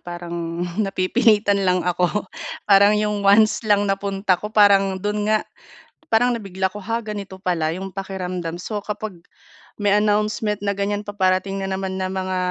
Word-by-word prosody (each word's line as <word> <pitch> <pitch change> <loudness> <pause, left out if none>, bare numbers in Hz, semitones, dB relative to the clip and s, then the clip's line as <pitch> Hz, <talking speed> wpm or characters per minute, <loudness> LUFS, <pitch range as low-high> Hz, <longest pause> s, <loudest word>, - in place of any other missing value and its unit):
parang 170 0 -5 0.2
napipilitan 205 +1 +2
lang 185 -2 +1
ako. 180 +3 0 0.4
Parang 205 +1 +5
'yong 210 -1 0
once 205 +2 +4
lang 205 0 +4
na 195 -1 0
punta 195 -2 0
ko, 210 - -4
parang 200 -2 +4
do'n 210 +2 -2
nga 215 0 +2 0.7
parang 245 +2 +3
nabigla 190 -4 -3
ko, 210 - -7
"Ha? 230 +3 -3
Ganito 200 -3 -6
pala 175 -4 -1
'yong 190 +1 -7
pakiramdam." 185 -3 -4
So, 205 +3 -5
kapag 210 -4 -6 0.6
may 205 -1 +2
announcement 210 0 +1
na 200 - +1
ganyan 205 +1 -2
paparating 195 -1 0
na 195 - -3
naman 190 0 -3
na 185 - -1
mga 185 -1 -2
195 Hz, 160 wpm, -21 LUFS, 185-210 Hz, 0.7 s, Parang